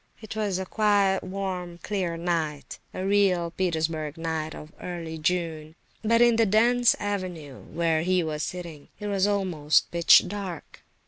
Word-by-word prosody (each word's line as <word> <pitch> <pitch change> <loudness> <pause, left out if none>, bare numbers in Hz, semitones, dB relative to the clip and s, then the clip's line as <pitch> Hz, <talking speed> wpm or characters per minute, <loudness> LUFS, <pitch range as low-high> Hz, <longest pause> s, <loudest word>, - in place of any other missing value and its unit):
It 220 0 -8
was 205 -4 -1
a 190 - -3
quiet, 200 -1 +2
warm, 185 -2 -4
clear 185 -5 -2
night—a 165 +1 -3
real 190 -4 +2
Petersburg 160 -3 -2
night 160 -1 -3
of 150 +1 -11
early 165 -3 -6
June; 160 -2 -2 0.3
but 230 +2 +3
in 240 -1 +4
the 225 -1 +4
dense 235 +4 +4
avenue, 180 -9 -5
where 165 -1 0
he 180 +1 +1
was 155 -1 -3
sitting, 170 -4 -6
it 210 - -6
was 200 -1 +1
almost 180 -7 +1
pitch 170 0 +6
dark. 190 -4 -7
180 Hz, 145 wpm, -26 LUFS, 160-200 Hz, 0.3 s, pitch